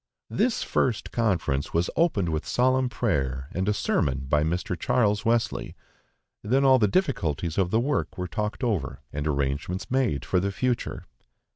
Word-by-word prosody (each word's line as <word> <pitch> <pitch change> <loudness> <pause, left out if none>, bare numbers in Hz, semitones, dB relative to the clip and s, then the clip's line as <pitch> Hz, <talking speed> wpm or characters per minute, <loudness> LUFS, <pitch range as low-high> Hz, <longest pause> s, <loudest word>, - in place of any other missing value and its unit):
This 245 -2 +1
first 120 -5 0
conference 85 - 0
was 85 +1 +1
opened 115 - +2
with 80 0 -1
solemn 130 +1 +2
prayer 70 - -1
and 95 +3 -1
a - - +4
sermon 70 -9 0
by 75 +2 +3
Mr. 85 +3 -1
Charles 115 0 +1
Wesley; 115 -1 0 0.7
then 130 +6 +2
all 130 -1 +6
the 105 - +4
difficulties 90 - 0
of 90 -2 +2
the 110 - +2
work 130 -6 -1
were 90 0 -3
talked 105 - -3
over, 100 - -1
and 75 +1 -2
arrangements 70 - -2
made 125 - +1
for 90 - +2
the 100 +2 -1
future. 120 +5 -2
100 Hz, 160 wpm, -26 LUFS, 80-120 Hz, 0.7 s, all